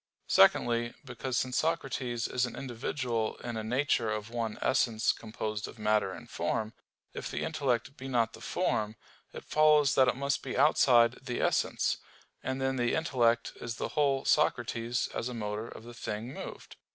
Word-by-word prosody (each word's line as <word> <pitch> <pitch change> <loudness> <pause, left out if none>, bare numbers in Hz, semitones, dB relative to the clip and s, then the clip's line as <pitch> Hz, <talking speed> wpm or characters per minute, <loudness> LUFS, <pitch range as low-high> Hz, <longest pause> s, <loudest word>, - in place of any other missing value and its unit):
Secondly, 120 0 +4
because 125 0 -3
since 130 -1 0
Socrates 135 -7 -1
is 125 0 0
an - - -8
individual 120 -2 -2
in 120 -1 -4
a 110 - -3
nature 120 0 +1
of 110 +1 -3
one 115 -2 -2
essence 120 -3 +2
composed 110 -1 -4
of - - -11
matter 105 -2 +1
and - - -9
form, 110 0 -2 0.4
if - - -5
the - - -3
intellect 130 -1 -1
be 135 - -7
not 120 -4 +1
the - - -12
form, 105 0 -1 0.4
it - - -9
follows 150 -3 +5
that 130 -1 +5
it 125 - +2
must 140 +1 -1
be - - -4
outside 125 -4 +5
the 125 -2 -3
essence, - - +1 0.4
and 130 0 -3
then 135 0 0
the 120 -1 +1
intellect 120 -8 +2
is 115 -1 -4
the - - -3
whole 140 -3 +1
Socrates 120 -5 +1
as 120 - -2
a 125 - -6
motor 105 0 -4
to - - -9
the 120 +2 -11
thing 115 +2 -5
moved. - - -9
120 Hz, 175 wpm, -30 LUFS, 115-130 Hz, 0.4 s, follows